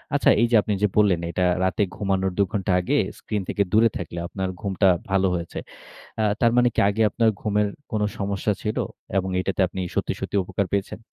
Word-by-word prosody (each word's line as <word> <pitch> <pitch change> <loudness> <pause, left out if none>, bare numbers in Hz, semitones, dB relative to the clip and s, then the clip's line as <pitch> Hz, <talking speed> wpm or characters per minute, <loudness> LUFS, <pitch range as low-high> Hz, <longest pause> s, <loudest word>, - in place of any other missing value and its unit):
আচ্ছা - - +3
এই 120 - +4
যে - - +5
আপনি 105 - -2
যে 105 - +4
বললেন 100 -5 +4
এটা 90 +2 0 0.2
রাতে 95 +3 +1
ঘুমানোর 95 -2 0
২ 100 - +4
ঘন্টা 100 -2 -1
আগে 90 - 0 0.2
স্ক্রিন 105 -2 -3
থেকে 100 - +1
দূরে 115 +2 +5
থাকলে 85 0 -6
আপনার 95 0 -3
ঘুমটা 95 -1 +2 0.2
ভালো 95 0 +2
হয়েছে। 85 -1 -5 0.6
আ - - +2 0.2
তার 115 -1 +5
মানে 125 0 +5
কি - - +1
আগে 105 +2 -1
আপনার 115 +2 +2
ঘুমের 105 -1 +1 0.2
কোন 110 -2 -1 0.2
সমস্যা 100 +1 -1
ছিল? 105 - -2 0.4
এবং 95 0 0
এটাতে 95 +1 -1
আপনি 95 +1 -5
সত্যি, - - 0
সত্যি - - -4
উপকার 100 +2 -2
পেয়েছেন? 100 +2 -2
100 Hz, 200 wpm, -24 LUFS, 95-105 Hz, 0.6 s, যে